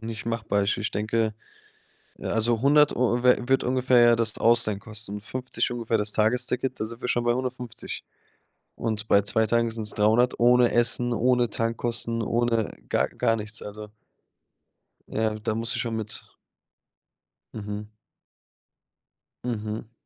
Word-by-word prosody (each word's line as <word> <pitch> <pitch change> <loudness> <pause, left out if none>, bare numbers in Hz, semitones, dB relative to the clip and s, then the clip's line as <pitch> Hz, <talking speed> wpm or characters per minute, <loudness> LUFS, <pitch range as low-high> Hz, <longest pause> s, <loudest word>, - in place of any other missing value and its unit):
nicht 115 0 -7
machbar. 110 -3 0
Ich 100 - +1
ich 105 -2 -3
denke, 110 +1 -1 0.8
äh, - - -11
also 115 0 +1
100 150 +2 +4
Eu 120 0 +1
wird 125 +1 +3
ungefähr 125 0 +3
ja 120 0 +6
das 115 -2 -1
Ausleihen 115 -3 +3
kosten. 105 -1 -3
50 130 +5 -2
ungefähr 115 -2 -1
das 105 0 -1
Tagesticket, 125 +3 0
da 110 - -1
sind 115 +1 -6
wir - - -4
schon 120 -1 +1
bei 120 0 +2
150. 125 -2 -5 0.7
Und 110 -2 -3
bei 100 - +5
2 110 +2 +1
Tagen 115 +1 +1
sind's 110 -2 +2
300 110 +5 +2
ohne 120 0 +5
Essen, 120 +1 +2
ohne 125 0 +2
Tankkosten, 115 +1 -2
ohne 115 -1 0 0.2
gar - - +1
gar 115 - +1
nichts. 110 -1 -5
Also 105 +1 -8 1.2
Ja, 110 0 -1
da 110 0 -2
muss 115 +1 -1
ich - - -1
schon 115 -2 -3
mit 110 -1 -6 1.3
Mhm. 105 0 -6 1.5
Mhm. 110 -1 -4
115 Hz, 145 wpm, -25 LUFS, 110-120 Hz, 1.5 s, ja